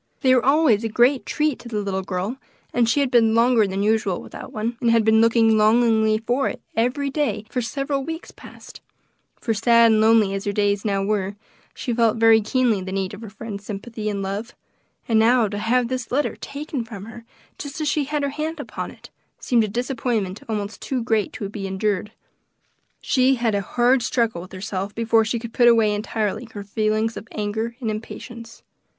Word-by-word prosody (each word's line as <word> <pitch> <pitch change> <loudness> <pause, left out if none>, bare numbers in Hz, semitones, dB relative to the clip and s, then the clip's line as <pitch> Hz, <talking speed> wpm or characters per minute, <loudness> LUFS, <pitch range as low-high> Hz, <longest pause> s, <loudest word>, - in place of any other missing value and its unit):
They 260 -1 +4
were 250 - +3
always 275 -6 +3
a 225 - -1
great 245 +5 +2
treat 300 -4 0
to 240 0 -10
the 215 -2 -2
little 195 -2 -2
girl, 190 +6 -3 0.4
and 235 -1 +2
she 285 +5 +2
had 270 -3 0
been 225 -2 +4
longer 230 -2 +4
than 195 +1 -2
usual 215 -3 +1
without - - -10
one, 230 0 -3
and 235 - +2
had 230 -1 +3
been 220 0 +5
looking 225 -1 +4
longingly 220 0 +4
for 245 +5 0
it - - -7 0.2
every 255 +5 0
day 285 -7 -1
for 250 - -1
several 275 +3 -2
weeks 325 +3 -6
past; - - -13 0.6
for 225 - -1
sad 230 +1 +5
and 215 0 +3
lonely 220 -3 +4
as 195 0 -3
her 205 - 0
days 205 -1 0
now 195 -2 0
were, 200 -1 -1 0.4
she 245 - -3
felt 230 -1 +2
very 225 0 +6
keenly 225 -2 +1
the 185 0 -6
need 190 0 -2
of 205 - -9
her 225 - -8
friend's 210 -1 -8
sympathy 215 +1 -5
and 200 -1 -3
love; 200 +4 -5 0.5
and 225 -2 +3
now 230 0 +4
to 205 0 -4
have 240 +3 +1
this 255 -1 -4
letter 285 +4 0
taken 280 -3 -5
from 205 -3 -9
her 230 +1 -11 0.4
just 285 +1 -6
as 305 - -1
she 300 - +1
laid 300 -1 0
her 280 - 0
hand 310 +3 -4
upon 285 - -5
it, - - -15 0.3
seemed 235 -3 +2
a - - -1
disappointment 230 -3 -2
almost 210 -1 -4
too 255 -3 -2
great 220 -3 0
to 200 - -5
be 195 -1 -5
endured. 200 +1 -1 0.9
She 265 0 +3
had 235 -3 0
a 200 - +1
hard 245 +6 +2
struggle 230 -5 0
with 185 - -12
herself 195 +1 -5
before 225 -1 +2
she 235 +2 -1
could 230 -1 -8
put 240 - +4
away 225 -3 +5
entirely 215 +2 -2
her 205 - -6
feelings 215 +2 -1
of 220 - -8
anger 220 +2 -3
and 225 -4 -2
impatience. 230 +2 -8
225 Hz, 205 wpm, -22 LUFS, 210-245 Hz, 0.9 s, very